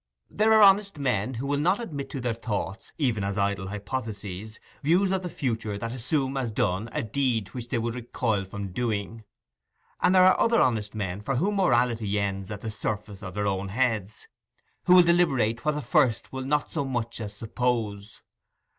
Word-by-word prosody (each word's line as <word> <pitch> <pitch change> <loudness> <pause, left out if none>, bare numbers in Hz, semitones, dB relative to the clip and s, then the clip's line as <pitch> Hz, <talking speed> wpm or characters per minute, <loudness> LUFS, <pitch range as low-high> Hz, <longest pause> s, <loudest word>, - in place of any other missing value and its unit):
There 215 +2 +3
are 220 -1 +7
honest 200 -2 +5
men 125 -3 0
who 125 +4 -4
will 140 0 0
not 180 +8 +2
admit 145 - -5
to 135 - -5
their 120 -2 -1
thoughts, 110 -3 -4
even 120 -9 0
as 100 +1 -2
idle 100 -1 0
hypotheses, 105 -1 -5 0.2
views 180 +6 +3
of 190 -1 0
the 180 - -4
future 115 -9 -2
that 115 +2 -4
assume 135 +2 -1
as 125 -4 -1
done 105 -1 -1
a - - -2
deed 115 -3 0
which 120 +1 -7
they 120 - -1
would 115 0 -1
recoil 115 -3 -1
from 100 0 -6
doing; 110 0 -3 0.8
and 185 - +4
there 185 0 +7
are 185 - +5
other 230 0 +4
honest 110 -4 +1
men 100 -2 -3
for 135 +6 -2
whom 200 +10 +1
morality 120 - +2
ends 95 -1 -2
at 105 -1 -6
the 110 - -4
surface 105 -1 -4
of 95 -3 -7
their 105 0 -1
own 100 -1 -1
heads, 110 -2 -1 0.6
who 180 - +8
will 180 - +9
deliberate 140 -10 +2
what 150 0 +2
the 150 - -3
first 125 -1 +2
will 130 - -3
not 150 +2 0
so 160 - 0
much 120 -4 -3
as 105 -1 -6
suppose. 110 -3 -2
115 Hz, 190 wpm, -26 LUFS, 105-140 Hz, 0.8 s, will